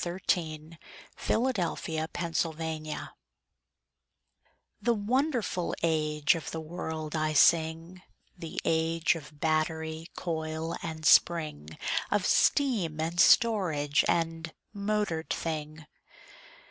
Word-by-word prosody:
THE 175 - -3
AGE 160 -3 -2 0.5
OF 225 - +3
MOTORED 170 -9 -1
THINGS 160 -2 -2 1.8
The 235 +3 +2
wonderful 230 - 0
age 155 -2 +2
of 165 - -5
the 160 - -4
world 160 -1 -5
I 155 0 0
sing— 165 +4 +3 0.3
The 165 -3 -5
age 165 0 +2
of 150 -2 -10
battery, 160 +1 -1
coil 160 0 -3
and 160 -1 -6
spring, 150 - +3 0.3
Of 205 -3 +1
steam, 210 - +2
and 165 +2 -2
storage, 175 -11 +4
and 165 -1 -1 0.2
motored 200 -5 -1
thing. 155 -1 -4
160 Hz, 95 wpm, -29 LUFS, 155-175 Hz, 1.8 s, storage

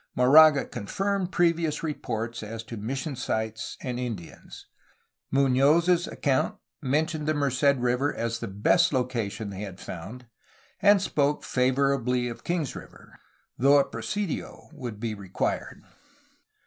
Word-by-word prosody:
Moraga 145 +3 +7
confirmed 190 - -2
previous 165 -3 +1
re 155 -2 -1
ports 115 -2 -4
as 110 +1 -6
to 115 +1 -8
mission 135 +7 -4
sites 110 -2 -3
and 125 -2 -4
Indians. 115 -9 -7 0.6
Munoz's 145 +7 +3
account 135 -3 0 0.2
mentioned 150 +3 0
the 155 - +1
Merced 140 0 +2
River 125 +3 +1
as 115 0 -3
the 115 - -4
best 105 - +2
location 115 -5 -2
they 95 0 -7
had 95 -3 -7
found, 110 +9 -8 0.6
and 205 -1 +5
spoke 145 -4 0
favorably 125 -1 +1
of 115 - -9
Kings 170 -6 -2
River, - - -13 0.4
though 140 +3 +6
a 140 - +4
presidio 185 - -4
would 125 -8 -7
be 115 -1 -2
required. 100 -3 -3
130 Hz, 130 wpm, -27 LUFS, 115-150 Hz, 0.6 s, Moraga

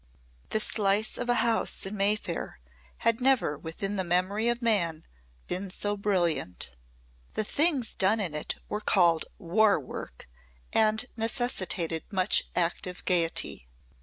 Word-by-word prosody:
The 220 - 0
slice 210 0 +1
of 245 - -4
a 245 - +4
house 230 -4 0
in 195 +2 -4
Mayfair 200 - 0 0.5
had 230 +2 +2
never 255 - +3
within 195 +7 -4
the 190 - 0
memory 185 +5 0
of 240 0 0
man 175 -9 +1 0.4
been 190 +2 -1
so 205 +2 -2
brilliant. 175 - 0 0.6
The - - 0
things 280 0 +1
done 200 +4 +2
in 180 -7 -1
it 150 - -3
were 210 - -4
called 170 -6 +3
War 205 +1 +3
Work 65 - -9 0.5
and 220 +1 +3
necessitated 220 -8 -1
much 190 0 +3
active 180 +1 -1
gaiety. 165 - +1
200 Hz, 135 wpm, -28 LUFS, 170-220 Hz, 0.6 s, a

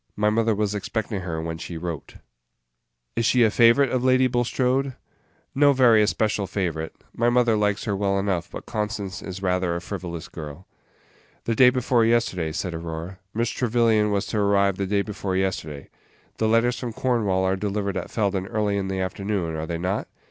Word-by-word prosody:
My 105 0 +2
mother 115 0 +2
was 105 0 0
expecting 105 0 -3
her 85 -3 -4
when 80 0 -4
she 85 - -6
wrote." 85 -2 -6 1.0
"Is 115 - 0
she 120 +1 +4
a 110 - +4
favorite 120 +4 +5
of 125 -1 0
Lady 130 0 +4
Bulstrode?" 125 +2 0 0.6
"No 145 +1 +5
very 120 -5 +5
especial 105 -1 +1
favorite. 80 -5 -3 0.2
My 120 +1 +2
mother 120 -2 +3
likes 105 -1 0
her 105 -3 -1
well 100 0 0
enough; 95 -2 -1
but - - -8
Constance 105 -3 -3
is 95 +1 -7
rather 90 -2 +1
a - - -2
frivolous 90 -3 -6
girl." 75 +3 -9 0.8
"The 115 - 0
day 125 +2 +7
before 125 -2 +2
yesterday," 110 -8 +1
said 90 +2 -3
Aurora; 85 +2 -6 0.2
"Miss 115 +1 0
Trevyllian 115 -3 +2
was 100 -1 0
to 110 - -2
arrive 100 -1 +2
the 100 - -2
day 100 +1 +1
before 100 -2 -4
yesterday. 80 -7 -3 0.5
The 110 - +2
letters 115 +2 +2
from 120 -3 -4
Cornwall 110 -7 +1
are 95 0 +2
delivered 100 0 -2
at - - -4
Felden 100 -3 -1
early 105 -2 0
in 95 -1 -2
the 95 0 -2
afternoon, 95 -2 -2
are 80 0 -4
they 85 - -2
not?" 90 +4 -2
100 Hz, 185 wpm, -24 LUFS, 95-115 Hz, 1.0 s, day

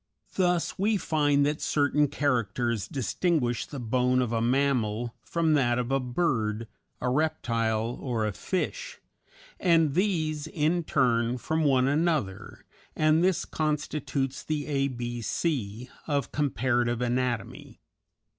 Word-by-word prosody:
Thus 180 -2 0
we 210 +2 +2
find 145 -5 +2
that 150 +1 -1
certain 145 0 +2
characters 120 -5 0
distinguish 130 - 0
the 140 - -7
bone 125 +2 +1
of 120 -2 0
a 115 - +1
mammal 120 -3 +1
from 165 -2 0
that 120 -5 +2
of 125 +1 -2
a 135 - +3
bird, 120 -5 -1 0.3
a - - -2
reptile, 115 -6 0
or 120 -5 -1
a 105 - 0
fish, 195 - -3 0.6
and 165 -5 +3
these 155 -5 0
in 165 0 0
turn 120 -3 +2
from 160 +6 -1
one 130 -3 +3
another, 140 - -1 0.3
and 155 +2 +3
this 185 -1 +2
constitutes 145 -3 -2
the 150 -2 -3
A 140 -2 0
B 120 -2 -4
C 120 - -2 0.2
of 140 -5 -1
comparative 120 -3 0
anatomy. 125 -3 -2
135 Hz, 125 wpm, -27 LUFS, 120-155 Hz, 0.6 s, a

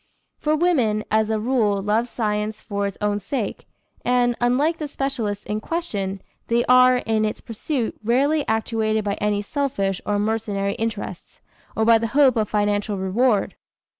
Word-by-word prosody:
For 305 0 +1
women, 260 -11 +2
as 220 0 +2
a 220 -1 0
rule, 215 -4 +1
love 210 +4 0
science 210 -2 -2
for 200 -1 -2
its 200 - -7
own 205 0 0
sake, 210 +1 -4 0.4
and, 245 -1 +2
unlike 275 +7 +2
the 305 - -3
specialists 245 -8 -3
in 210 0 -2
question, 200 - -3 0.2
they 235 +1 +2
are, 255 0 +6
in 220 -3 0
its 215 - -2
pursuit, 235 +2 -3
rarely 280 +7 +2
actuated 220 -1 0
by 200 -1 -1
any 205 0 0
selfish 200 -7 -1
or 205 - 0
mercenary 205 -2 -1
interests, 225 -2 -5 0.4
or 220 - +1
by 230 0 +6
the 230 - -1
hope 275 -4 +6
of 215 -2 0
financial 205 0 0
reward. 200 +3 +1
220 Hz, 160 wpm, -22 LUFS, 205-250 Hz, 0.4 s, are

